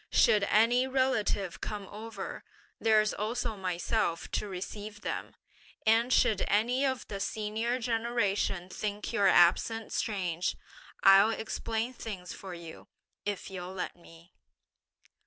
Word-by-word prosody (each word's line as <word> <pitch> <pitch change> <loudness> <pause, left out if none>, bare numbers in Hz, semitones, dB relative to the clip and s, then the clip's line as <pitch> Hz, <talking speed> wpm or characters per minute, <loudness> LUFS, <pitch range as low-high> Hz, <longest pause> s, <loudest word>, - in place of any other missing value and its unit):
Should 205 -2 +4
any 240 +5 +4
relative 220 -7 0
come 210 -2 -4
over, 215 -1 -7 0.4
there's 215 -1 +3
also 225 +1 -2
myself 180 -1 -1
to - - -1
receive 205 +3 -7
them; - - -4 0.5
and 225 +3 +4
should 215 -5 +3
any 240 +6 +2
of 260 -2 -1
the 200 - -5
senior 220 +4 -1
generation 225 -6 0
think 210 +1 -4
your 200 - +4
absence 190 +5 +4
strange, 180 -5 -1 0.5
I'll 195 +2 +8
explain 225 +1 -2
things 195 -7 -7
for 190 -2 -8
you, 170 -2 -10 0.4
if 205 -1 -3
you'll 180 0 -6
let 185 - -4
me.' 170 0 -17
210 Hz, 120 wpm, -30 LUFS, 190-225 Hz, 0.5 s, I'll